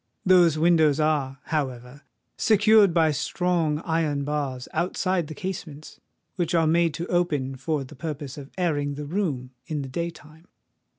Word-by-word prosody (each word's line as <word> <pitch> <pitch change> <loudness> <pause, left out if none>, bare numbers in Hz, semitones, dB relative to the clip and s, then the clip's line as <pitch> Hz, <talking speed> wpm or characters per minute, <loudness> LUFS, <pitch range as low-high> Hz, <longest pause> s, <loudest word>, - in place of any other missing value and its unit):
Those 175 -4 +5
windows 160 -3 +4
are, 145 -3 0
however, 130 -3 -4 0.3
secured 215 -2 +5
by 165 -2 +3
strong 165 0 0
iron 160 -4 0
bars 140 -4 -3
outside 180 -1 0
the 155 - -8
casements, 160 -4 -7 0.4
which 175 -1 0
are 165 -1 +3
made 165 0 +2
to 170 - -4
open 155 -8 0
for 145 +2 -2
the 130 - -12
purpose 145 -1 -6
of 140 -2 -9
airing 145 -5 0
the 150 +1 -6
room 145 -7 -2 0.2
in 150 -3 -3
the 135 - -7
day 170 +6 -2
time. 160 +1 -16
155 Hz, 155 wpm, -25 LUFS, 145-170 Hz, 0.4 s, Those